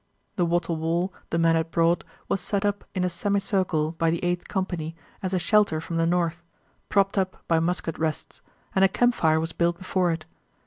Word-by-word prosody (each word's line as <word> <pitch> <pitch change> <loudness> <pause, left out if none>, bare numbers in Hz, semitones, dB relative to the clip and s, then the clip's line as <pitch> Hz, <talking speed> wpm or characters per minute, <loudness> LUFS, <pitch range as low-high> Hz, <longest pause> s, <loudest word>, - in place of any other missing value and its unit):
The 175 -2 +1
wattle 170 -1 0
wall 170 +4 0 0.2
the 170 - 0
men 165 0 +4
had 165 0 0
brought 170 +1 +2 0.2
was 195 - 0
set 200 +2 -1
up 205 0 -1
in 185 - 0
a - - +2
semicircle 185 -3 0
by 165 - +3
the 170 +1 -1
Eighth 175 0 -1
Company 175 -5 -3 0.3
as 185 -2 -2
a 190 - +1
shelter 205 -3 +3
from 165 +1 -4
the 165 0 +2
north, 170 -1 0 0.5
propped 195 0 +3
up 190 -1 -3
by 165 -1 +3
musket 165 0 -1
rests, 160 -2 -3 0.3
and 190 - +3
a - - +8
campfire 190 -8 +2
was 165 +1 -3
built 170 0 +1
before 185 -1 0
it. 165 -1 -4
175 Hz, 195 wpm, -26 LUFS, 165-190 Hz, 0.5 s, a